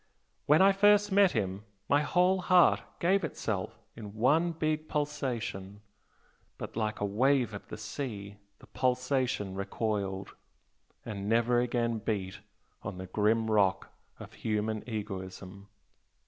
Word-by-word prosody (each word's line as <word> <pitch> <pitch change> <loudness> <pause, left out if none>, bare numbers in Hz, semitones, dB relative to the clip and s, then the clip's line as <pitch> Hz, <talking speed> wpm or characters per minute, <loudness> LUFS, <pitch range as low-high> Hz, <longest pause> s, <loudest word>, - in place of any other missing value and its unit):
When 155 +5 +6
I 195 - +7
first 205 +1 +4
met 195 -1 +5
him, 95 +1 -2 0.2
my 145 +1 +3
whole 180 +6 +2
heart 180 -1 +5 0.2
gave 190 +3 +2
itself - - -3 0.2
in 105 -2 -9
one 150 +10 +3
big 155 -1 -2
pulsation 120 -9 -3 0.8
but - - -7
like 110 -1 -2
a 105 - 0
wave 125 +3 +2
of 100 - -8
the - - -7
sea, 105 -3 -6 0.2
the - - -17
pulsation 125 -5 -1
recoiled, 100 -1 -3 0.7
and 100 -1 -5
never 120 +2 +3
again 120 -2 0
beat 100 -3 -3 0.4
on 95 -3 -6
the 95 - -6
grim 110 +4 +1
rock 100 -3 +2 0.3
of - - -10
human 110 0 -2
egoism!" 100 -2 -6
115 Hz, 130 wpm, -30 LUFS, 100-145 Hz, 0.8 s, I